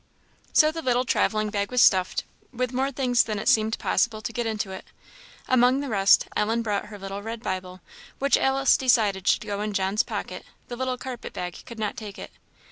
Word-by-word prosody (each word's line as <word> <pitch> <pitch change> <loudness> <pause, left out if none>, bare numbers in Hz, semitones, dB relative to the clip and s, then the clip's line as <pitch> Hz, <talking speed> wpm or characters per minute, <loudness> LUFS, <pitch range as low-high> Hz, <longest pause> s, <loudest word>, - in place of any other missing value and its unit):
So 310 0 +5
the 325 +1 -5
little 250 -2 +1
travelling 215 -3 +1
bag 200 -1 -1
was 250 - 0
stuffed, 185 -5 +4 0.3
with 250 0 -3
more 265 +2 0
things 250 -2 +2
than 215 -2 -2
it 200 - -4
seemed 220 0 +3
possible 225 -2 0
to 230 - -6
get 240 0 -2
into 215 -3 -3
it. 190 - -7 0.6
Among 255 +1 +4
the 280 -1 -4
rest, 200 -2 +4
Ellen 225 +2 0
brought 205 -3 -2
her 210 -1 -9
little 195 0 -6
red 225 +2 -6
Bible, 185 -2 -5 0.4
which 280 +1 +3
Alice 270 0 +3
decided 215 -7 +2
should - - +2
go 205 -1 -3
in 210 0 -3
John's 195 +2 +1
pocket; - - -6 0.3
the 240 - -5
little 255 0 -2
carpet 250 -1 -7
bag 180 -1 -5
could 235 - -9
not 215 -2 -3
take 210 -3 -8
it. - - -9
220 Hz, 205 wpm, -25 LUFS, 200-250 Hz, 0.6 s, So